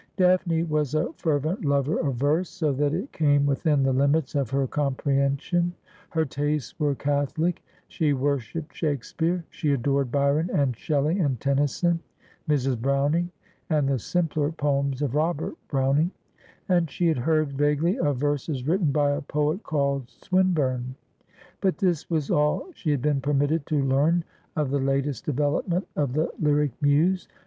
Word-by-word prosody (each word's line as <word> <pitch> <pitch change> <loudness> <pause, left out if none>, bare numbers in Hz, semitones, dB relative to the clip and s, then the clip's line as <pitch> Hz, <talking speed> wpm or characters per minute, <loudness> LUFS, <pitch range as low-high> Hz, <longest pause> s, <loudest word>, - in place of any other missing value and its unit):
Daphne 180 -3 +3
was 150 -3 -1
a 155 - 0
fervent 160 - -1
lover 140 +1 +1
of 140 -5 -1
verse, 150 +8 +1
so 155 -6 -1
that 145 +2 +1
it 185 - -3
came 145 -2 +3
within 145 0 +2
the 135 0 +2
limits 140 +2 +2
of 140 -5 0
her 135 0 +1
comprehension. 140 +5 0 0.4
Her 160 -1 0
tastes 145 0 -2
were 145 -2 +1
catholic; 145 +5 -1 0.2
she 155 -2 0
worshipped 140 +2 -2
Shake 145 -6 -1
speare; 170 +4 -1
she 145 -2 0
adored 135 0 0
Byron 145 +4 +2
and 135 -4 +1
Shelley 150 - 0
and 140 - 0
Tennyson, 145 +6 +1 0.5
Mrs. 135 -5 +1
Browning, 140 +6 +1 0.4
and 150 -4 +2
the 135 -2 +1
simpler 155 - 0
poems 140 -3 0
of 135 -4 -1
Robert 155 +1 0
Browning; 140 +4 +2 0.6
and 175 -3 +2
she 175 - -2
had 160 -6 +1
heard 155 +1 +1
vaguely 150 - +1
of 145 - +1
verses 145 -1 -2
written 170 -2 +2
by 145 0 +2
a 145 +2 -1
poet 150 +5 -1
called 140 - -1
Swinburne; 135 -6 0 0.7
but 190 -2 +1
this 180 -6 0
was 155 -4 -1
all 150 0 +2
she 165 - -4
had 145 -4 0
been 145 -2 +1
permitted 145 +2 +1
to 150 -3 +1
learn 150 +6 +2 0.3
of 150 -4 0
the 140 - +1
latest 135 -1 -1
development 150 +6 0
of 140 -4 0
the 155 +3 0
lyric 150 -2 +2
muse. 155 +6 +2
145 Hz, 155 wpm, -25 LUFS, 140-160 Hz, 0.7 s, Daphne